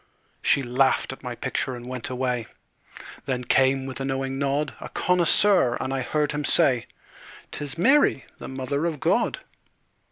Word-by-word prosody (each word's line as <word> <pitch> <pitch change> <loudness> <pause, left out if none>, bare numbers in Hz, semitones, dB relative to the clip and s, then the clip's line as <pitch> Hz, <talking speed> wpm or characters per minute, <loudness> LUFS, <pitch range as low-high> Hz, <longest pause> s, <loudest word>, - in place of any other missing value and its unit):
She 140 - +3
laughed 130 +2 +1
at - - -14
my - - -6
picture 130 - -3
and 120 0 -9
went 125 -1 -5
away. 125 -3 -2 0.8
Then 125 -2 -2
came, 135 +2 +2
with 130 0 -6
a - - -3
knowing 135 0 -3
nod, 140 +1 -1
A - - -8
connoisseur, 180 -5 +3
and 130 +1 -3
I 135 - -1
heard 150 +3 -1
him 150 0 -3
say; 135 -6 +3 0.6
"'Tis 145 +1 -5
Mary, 265 - +3
the - - -8
Mother 135 +4 -2
of 155 -4 -4
God." - - 0
135 Hz, 160 wpm, -24 LUFS, 130-150 Hz, 0.8 s, She